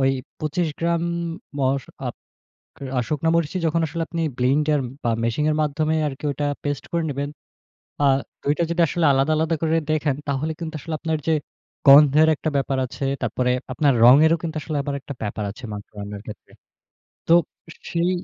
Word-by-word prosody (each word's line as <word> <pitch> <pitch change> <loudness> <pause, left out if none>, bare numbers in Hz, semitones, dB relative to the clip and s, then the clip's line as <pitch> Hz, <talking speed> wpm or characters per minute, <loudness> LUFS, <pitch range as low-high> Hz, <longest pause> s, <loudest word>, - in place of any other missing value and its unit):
ওই 135 - +4 0.3
পঁচিশ 155 +3 -1
গ্রাম, 170 0 0 0.6
মশ 135 0 +1 0.2
আপ - - -4 0.8
আ - - +3
শুকনা 155 +1 0
মরিচই 170 +2 0
যখন 165 +1 +1
আসলে 165 +2 -4
আপনি 165 -1 -2 0.2
ব্লেন্ডার 145 +4 +2 0.2
বা 120 - +2
মেশিনের 150 +6 +1
মাধ্যমে 155 +1 0
আরকি 145 0 -6
ওইটা 145 +1 -2 0.2
পেস্ট 145 -2 -2
করে 170 -1 0
নিবেন। 140 +1 -3 0.7
আ - - +5 0.4
২ 145 - +2
টা - - +2
যদি 170 +1 +1
আসলে 170 +1 0
আলাদা, 135 +3 +2
আলাদা 160 +1 +1
করে 160 0 +2
দেখেন 150 -3 +1
তাহলে 140 +3 -1
কিন্তু 165 -1 -5
আসলে 160 +3 -6
আপনার 160 -1 -1
যে 160 - +4 0.5
গন্ধের 150 +2 +8
একটা 155 - -2
ব্যাপার 135 0 0
আছে। 125 - -7 0.2
তারপরে 125 +2 0 0.2
আপনার 145 0 +3
রঙেরও 155 +7 +7
কিন্তু 160 -2 -4
আসলে 155 -1 -3
আবার 140 0 -3
একটা 140 - -7
ব্যাপার 105 0 -3
আছে 120 +6 -14
মাংস 105 0 -7
রান্নার 100 0 -6
ক্ষেত্রে। 105 - -11 0.8
তো - - +5 0.6
সেই 170 +1 +1
150 Hz, 170 wpm, -23 LUFS, 135-160 Hz, 0.8 s, গন্ধের